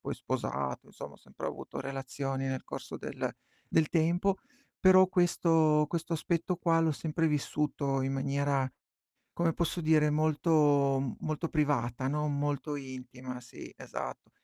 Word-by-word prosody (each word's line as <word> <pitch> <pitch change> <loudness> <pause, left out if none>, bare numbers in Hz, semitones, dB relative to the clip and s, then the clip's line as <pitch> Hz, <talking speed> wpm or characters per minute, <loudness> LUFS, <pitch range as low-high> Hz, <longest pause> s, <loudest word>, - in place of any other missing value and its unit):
poi - - -4
sposato, 70 0 -3
insomma - - -9
ho - - -15
sempre - - -8
avuto - - -6
relazioni 135 0 -3
nel 130 -1 -3
corso - - -7
del - - -3 0.4
del 160 -2 +3
tempo, 175 +4 +2 0.4
però 185 0 +7
questo 165 -4 +3
questo 170 0 -3
aspetto 170 +2 -1
qua 165 -2 +2
l'ho 160 -1 +3
sempre 160 +2 -1
vissuto 145 -2 0
in 135 +1 -1
maniera, 140 -1 0 0.6
come 170 -1 +1
posso 170 +1 -1
dire, 155 -1 +4
molto 145 -4 +3
molto 155 +1 -2
privata, 130 -5 0
no, 150 +2 0
molto 145 0 -1
intima, 130 -1 -7
sì, 120 - -11
esatto. - - -7
150 Hz, 135 wpm, -31 LUFS, 135-165 Hz, 0.6 s, però